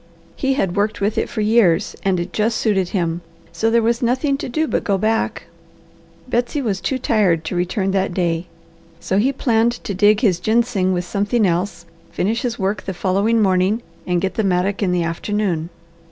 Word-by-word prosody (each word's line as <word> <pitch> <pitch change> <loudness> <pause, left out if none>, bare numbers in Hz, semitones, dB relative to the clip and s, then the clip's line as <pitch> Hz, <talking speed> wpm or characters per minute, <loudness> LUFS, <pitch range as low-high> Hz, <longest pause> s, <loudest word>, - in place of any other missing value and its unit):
He 270 0 0
had 190 -9 -1
worked 210 +1 0
with 205 +2 0
it - - -2
for 215 - -3
years 210 -4 +3
and 190 -2 +1
it 175 - -5
just 220 +1 +1
suited 195 -5 +1
him, 170 -3 -1 0.3
so 195 +7 0
there 230 0 +3
was 235 +1 +1
nothing 260 +4 +1
to - - -4
do 315 +5 0
but - - -1
go 200 -2 +1
back. 215 - 0 0.8
Betsy 245 +4 -1
was 205 -8 -2
too 260 +7 -1
tired 200 -10 +1
to 170 - -3
return 190 +2 0
that 190 -1 0
day, 175 -1 -1 0.5
so 190 +3 0
he 255 +6 +2
planned 235 -3 +1
to 200 - -3
dig 205 +3 +4
his 190 -8 +2
ginseng 220 -2 +1
with 180 -1 -1
something 205 +4 0
else, 175 -1 -1 0.2
finish 225 +6 -1
his 240 -2 -2
work 195 0 -1
the 190 - -4
following 205 +5 +1
morning, 190 +4 +2 0.2
and 180 -1 +1
get 190 0 -1
the 220 - -1
mattock 190 +1 0
in 190 -3 +1
the 180 -1 +1
afternoon. 170 -1 -2
200 Hz, 195 wpm, -20 LUFS, 180-225 Hz, 0.8 s, dig